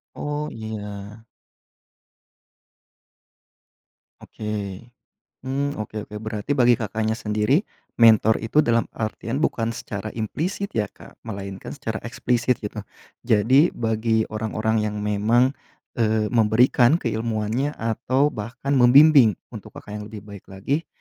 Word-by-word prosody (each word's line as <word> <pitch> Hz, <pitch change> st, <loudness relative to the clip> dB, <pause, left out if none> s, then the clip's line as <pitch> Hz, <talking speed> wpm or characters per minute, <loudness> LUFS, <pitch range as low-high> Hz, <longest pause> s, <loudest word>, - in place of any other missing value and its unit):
Oh, 150 Hz, +1 st, -3 dB
iya. 105 Hz, -1 st, -7 dB, 2.9 s
Oke. -, -, -13 dB, 1.0 s
Mmm, 140 Hz, +2 st, -2 dB
oke 105 Hz, 0 st, -6 dB
oke, 105 Hz, -, -9 dB
berarti 110 Hz, +5 st, -3 dB
bagi 120 Hz, -3 st, +4 dB
Kakaknya 110 Hz, 0 st, -2 dB
sendiri, 110 Hz, -, +1 dB, 0.3 s
mentor 110 Hz, -1 st, +6 dB
itu 115 Hz, +8 st, +2 dB
dalam 115 Hz, 0 st, +1 dB
artian 115 Hz, +5 st, -3 dB
bukan 115 Hz, -4 st, 0 dB
secara 105 Hz, 0 st, -6 dB
implisit, 165 Hz, -, -3 dB
ya, 105 Hz, -2 st, -1 dB
Kak, -, -, -17 dB
melainkan 100 Hz, 0 st, -6 dB
secara 110 Hz, -6 st, -4 dB
eksplisit, 120 Hz, 0 st, 0 dB
gitu. 105 Hz, +1 st, -5 dB, 0.5 s
Jadi, 130 Hz, +9 st, +4 dB
bagi 110 Hz, -1 st, 0 dB
orang-orang 110 Hz, 0 st, -1 dB
yang 105 Hz, 0 st, -4 dB
memang, 110 Hz, +5 st, +2 dB, 0.5 s
eee, 110 Hz, -1 st, +1 dB
memberikan 120 Hz, +4 st, +4 dB
keilmuannya 115 Hz, +1 st, -1 dB
atau 130 Hz, +6 st, 0 dB
bahkan 120 Hz, +4 st, -6 dB
membimbing, 135 Hz, -, +7 dB, 0.2 s
untuk -, -, -10 dB
Kakak 105 Hz, 0 st, -8 dB
yang 105 Hz, -, -7 dB
lebih 105 Hz, -2 st, -9 dB
baik 100 Hz, -2 st, -12 dB
lagi, 135 Hz, +12 st, -3 dB
110 Hz, 115 wpm, -23 LUFS, 105-125 Hz, 2.9 s, membimbing